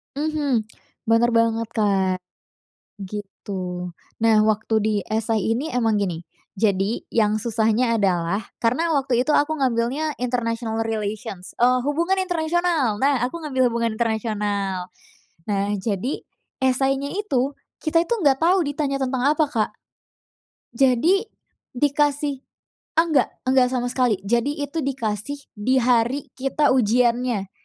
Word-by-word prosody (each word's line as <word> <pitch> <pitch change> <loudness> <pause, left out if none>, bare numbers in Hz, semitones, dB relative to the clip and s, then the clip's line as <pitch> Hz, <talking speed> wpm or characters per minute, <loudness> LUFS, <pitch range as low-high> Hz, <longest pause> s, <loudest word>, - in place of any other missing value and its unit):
Mhm, 285 -7 -1 0.4
bener 230 +1 +4
banget, 230 0 +2
Kak, 190 -4 +1 0.8
gitu. 185 -3 -6 0.3
Nah, 225 -1 +5
waktu 220 +1 0
di 215 0 0
essay 220 -1 -1
ini 255 +7 0
memang 225 -4 +2
gini, 175 -4 -2 0.3
jadi 200 +1 0
yang 215 -1 +1
susahnya 230 +1 +1
adalah 185 -1 +1 0.2
karena 310 +8 +1
waktu 260 -3 +1
itu 300 - +2
aku 295 +2 +3
ngambilnya 265 +4 0
international 230 -2 -1
relations, 210 -4 -5
eee, 250 +1 +4
hubungan 340 +7 +1
internasional. 335 - +1
Nah 275 -2 +3
aku 335 +5 -7
ngambil 260 -4 +1
hubungan 235 -1 0
internasional. 205 -5 -1 0.6
Nah, 205 0 -1
jadi 205 +5 -3 0.3
essay-nya 270 +1 +1
itu 275 -9 0 0.2
kita 330 +1 +1
itu 470 +7 0
enggak 280 -8 +2
tahu 355 +2 +3
ditanya 285 -1 -1
tentang 265 0 0
apa, 310 - +4
Kak. 220 -3 0 1.1
Jadi 275 - +3 0.5
dikasih 285 +1 0 0.5
enggak 325 -3 +3 0.2
enggak 260 -1 +4
sama 245 -1 -1
sekali. 250 -4 +2
Jadi 240 +8 0
itu 285 +3 -4
dikasih 270 0 -3
di 255 +4 +2
hari 245 +3 +1
kita 275 +3 +1
ujiannya, 240 -3 +2
245 Hz, 120 wpm, -23 LUFS, 215-280 Hz, 1.1 s, Nah